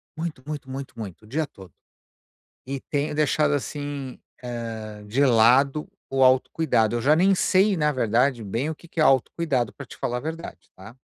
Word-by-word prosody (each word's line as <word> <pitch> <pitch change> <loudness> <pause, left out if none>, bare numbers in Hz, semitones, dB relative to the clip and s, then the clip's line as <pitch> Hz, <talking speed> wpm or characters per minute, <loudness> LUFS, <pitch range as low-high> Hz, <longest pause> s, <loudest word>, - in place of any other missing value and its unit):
muito, 160 -5 -5
muito, 145 -3 -6
muito, 135 0 -6
muito, 100 -5 -7
o - - -16
dia 150 +6 -1
todo. 95 - -15 0.9
E 135 +1 -4
tenho 145 +2 -2
deixado, 150 0 +2
assim, 145 -2 -4 0.2
eh, 115 -3 -6
de 135 +7 +2
lado 130 +5 +4 0.2
o 135 0 0
autocuidado, 130 -3 +3
eu 120 - -2
já 150 +4 +4
nem 190 +4 +4
sei, 190 +2 +3
na 150 -2 +2
verdade 125 -1 +1
bem 115 +9 -2
o 160 - -5
que 170 - -16
que 165 - -4
é - - +5
autocuidado 135 -2 +2
pra 140 - -9
te - - -13
falar 125 0 -2
a - - -6
verdade, 160 +3 -7
tá. 100 +6 -12
135 Hz, 185 wpm, -24 LUFS, 120-150 Hz, 0.9 s, é